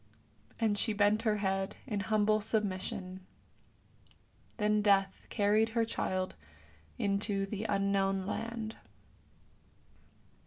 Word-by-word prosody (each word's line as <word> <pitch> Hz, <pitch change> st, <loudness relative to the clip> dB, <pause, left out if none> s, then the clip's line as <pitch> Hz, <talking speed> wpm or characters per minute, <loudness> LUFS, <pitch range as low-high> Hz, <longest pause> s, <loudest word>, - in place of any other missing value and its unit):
" -, -, -30 dB
And 215 Hz, -3 st, +1 dB
she 220 Hz, -, 0 dB
bent 205 Hz, +1 st, +3 dB
her 215 Hz, -2 st, +1 dB
head 195 Hz, 0 st, -1 dB
in 215 Hz, -6 st, -2 dB
humble 215 Hz, +2 st, +2 dB
submission. 190 Hz, -3 st, -2 dB, 1.3 s
Then 210 Hz, -1 st, +2 dB
Death 195 Hz, -2 st, +2 dB
carried 215 Hz, +1 st, +3 dB
her 230 Hz, -, +4 dB
child 185 Hz, -4 st, -2 dB, 0.6 s
into 200 Hz, 0 st, 0 dB
the 210 Hz, +2 st, -4 dB
Unknown 195 Hz, -2 st, +1 dB
Land. 225 Hz, +1 st, -4 dB
205 Hz, 105 wpm, -32 LUFS, 195-215 Hz, 1.3 s, her